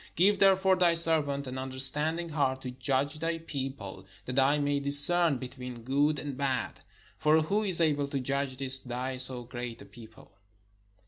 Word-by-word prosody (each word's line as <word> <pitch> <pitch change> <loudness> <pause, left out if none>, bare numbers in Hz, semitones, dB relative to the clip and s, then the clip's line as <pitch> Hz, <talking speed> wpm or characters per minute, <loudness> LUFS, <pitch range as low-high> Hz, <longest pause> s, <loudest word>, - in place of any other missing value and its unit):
Give 200 +3 +2
therefore 190 -1 +3
thy 175 -2 +2
servant 155 -4 +3
an 130 0 -7
understanding 150 +6 -1
heart 135 -4 -2
to 125 - -6
judge 135 +3 -3
thy 165 +1 -3
people, 135 -12 -8 0.2
that 125 +2 -3
I 140 +2 +2
may 145 -1 -2
discern 145 +2 +6
between 125 -2 -10
good 145 +4 0
and 140 -1 -7
bad: 135 -1 -4 0.4
for 155 +1 +2
who 200 +7 -2
is 190 -5 +3
able 145 -3 0
to 140 -1 -4
judge 135 0 -4
this 130 0 +2
thy 130 +1 -6
so 125 -1 +1
great 120 -1 -8
a - - -13
people?" 110 -2 -17
140 Hz, 170 wpm, -27 LUFS, 130-160 Hz, 0.4 s, discern